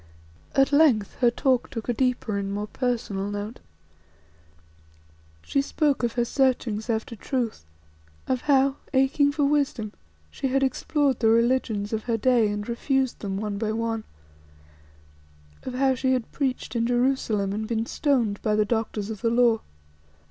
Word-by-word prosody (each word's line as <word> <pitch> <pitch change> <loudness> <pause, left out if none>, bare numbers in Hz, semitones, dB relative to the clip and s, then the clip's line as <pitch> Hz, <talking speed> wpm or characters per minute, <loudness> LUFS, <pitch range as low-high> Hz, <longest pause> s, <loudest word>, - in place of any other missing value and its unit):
At 270 +1 +4
length 285 -9 +4
her 245 - +5
talk 255 +1 +1
took 225 -2 -6
a 245 - +1
deeper 245 -4 0
and 200 0 -2
more 205 +1 -2
personal 215 -5 -2
note. 205 +3 -5 1.8
She 275 - +1
spoke 285 0 0
of 235 -2 0
her 240 -1 +1
searchings 240 -4 0
after 225 +1 -2
truth; 230 - -3 0.6
of 255 -1 0
how, 275 0 +4 0.2
aching 275 +2 +3
for 290 0 +1
wisdom, 280 -7 0 0.4
she - - -2
had 270 +1 +1
explored 275 0 +1
the 225 - +2
religions 230 -3 +1
of 220 -1 -2
her 230 -2 0
day 235 -1 +3
and 205 0 -4
refused 260 +2 0
them 195 -2 -3
one 205 -1 -3
by 220 -1 -1
one; 225 0 -2 1.6
of 255 - -6
how 265 0 +3
she 260 +1 +1
had 250 -3 -2
preached 260 -3 -2
in 230 0 +1
Jerusalem 240 -5 +1
and 215 +1 -3
been 225 0 -1
stoned 235 -8 0
by 210 -1 +1
the 215 0 +3
Doctors 220 -1 -2
of 210 -3 -7
the 230 - +2
Law. 235 -1 +3
235 Hz, 155 wpm, -25 LUFS, 215-265 Hz, 1.8 s, her